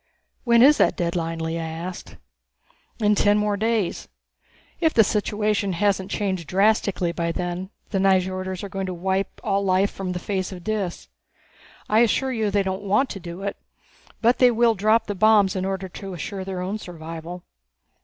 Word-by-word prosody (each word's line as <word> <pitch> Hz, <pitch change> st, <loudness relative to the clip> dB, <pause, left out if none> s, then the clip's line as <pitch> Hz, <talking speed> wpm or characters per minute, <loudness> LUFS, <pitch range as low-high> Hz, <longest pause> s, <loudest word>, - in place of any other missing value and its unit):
"When 235 Hz, -1 st, +6 dB
is 290 Hz, +3 st, +7 dB
that -, -, +3 dB
deadline?" 170 Hz, -1 st, -2 dB
Lea 165 Hz, +1 st, -3 dB
asked. 165 Hz, +2 st, -6 dB, 0.8 s
"In 210 Hz, -1 st, +3 dB
ten 205 Hz, 0 st, +3 dB
more 210 Hz, -1 st, +1 dB
days. 220 Hz, -2 st, -1 dB, 0.7 s
If 320 Hz, -2 st, +2 dB
the 225 Hz, -, +7 dB
situation 210 Hz, -1 st, 0 dB
hasn't 195 Hz, +1 st, 0 dB
been -, -, -2 dB
changed 190 Hz, -6 st, -2 dB
drastically 195 Hz, -1 st, +2 dB
by 170 Hz, -1 st, -2 dB
then, 180 Hz, +1 st, -4 dB, 0.2 s
the 195 Hz, -, 0 dB
Nyjorders 185 Hz, -1 st, +1 dB
are -, -, -4 dB
going 195 Hz, 0 st, -4 dB
to 185 Hz, -, -4 dB
wipe 190 Hz, +2 st, -2 dB
all 200 Hz, -2 st, 0 dB
life 190 Hz, +1 st, +2 dB
from 185 Hz, -2 st, -4 dB
the -, -, -3 dB
face 190 Hz, 0 st, -3 dB
of 180 Hz, -2 st, -9 dB
Dis. 205 Hz, -4 st, -3 dB, 0.8 s
I 215 Hz, -, +3 dB
assure 240 Hz, +3 st, +2 dB
you 220 Hz, -4 st, 0 dB
they 200 Hz, 0 st, +1 dB
don't 190 Hz, +1 st, -3 dB
want 210 Hz, +7 st, +1 dB
to 195 Hz, -, -6 dB
do 175 Hz, +2 st, -8 dB
it. 200 Hz, 0 st, -3 dB, 0.6 s
But 235 Hz, +2 st, +3 dB
they 250 Hz, -, +7 dB
will 235 Hz, 0 st, +3 dB
drop 215 Hz, +2 st, +2 dB
the 205 Hz, -, -3 dB
bombs 205 Hz, -1 st, +4 dB
in 185 Hz, 0 st, -1 dB
order 190 Hz, 0 st, -3 dB
to 190 Hz, +1 st, -8 dB
assure 190 Hz, +3 st, -5 dB
their 185 Hz, -1 st, -4 dB
own 195 Hz, +4 st, -3 dB
survival." 165 Hz, 0 st, -8 dB
195 Hz, 180 wpm, -23 LUFS, 180-210 Hz, 0.8 s, is